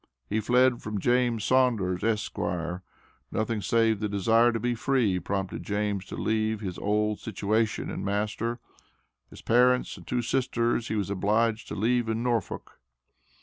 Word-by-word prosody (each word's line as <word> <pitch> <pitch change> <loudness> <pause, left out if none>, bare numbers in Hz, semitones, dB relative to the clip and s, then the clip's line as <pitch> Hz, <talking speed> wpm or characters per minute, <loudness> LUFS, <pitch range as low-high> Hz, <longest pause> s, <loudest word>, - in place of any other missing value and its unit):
He 110 - 0
fled 125 +2 +3
from 105 -1 -4
James 120 0 +1
Saunders, 115 -9 +2
Esq. 110 -2 -1 1.0
Nothing, 110 0 -1
save 110 +2 +2
the 105 -1 -2
desire 115 +4 +3
to 115 - -2
be 120 +2 0
free, 115 -6 +1
prompted 95 +2 -3
James 105 -2 -2
to - - -7
leave 110 0 0
his 95 -4 -5
old 105 +1 0
situation 110 +1 -1
and - - -5
master. 105 +4 -1 0.7
His - - -13
parents 125 +2 +3
and - - -14
two 125 -1 -1
sisters 120 -1 0
he - - -2
was 100 -2 -1
obliged 110 +3 +1
to - - -5
leave 120 +2 +1
in 110 +1 -1
Norfolk." 120 -4 -2
110 Hz, 150 wpm, -27 LUFS, 105-120 Hz, 1.0 s, fled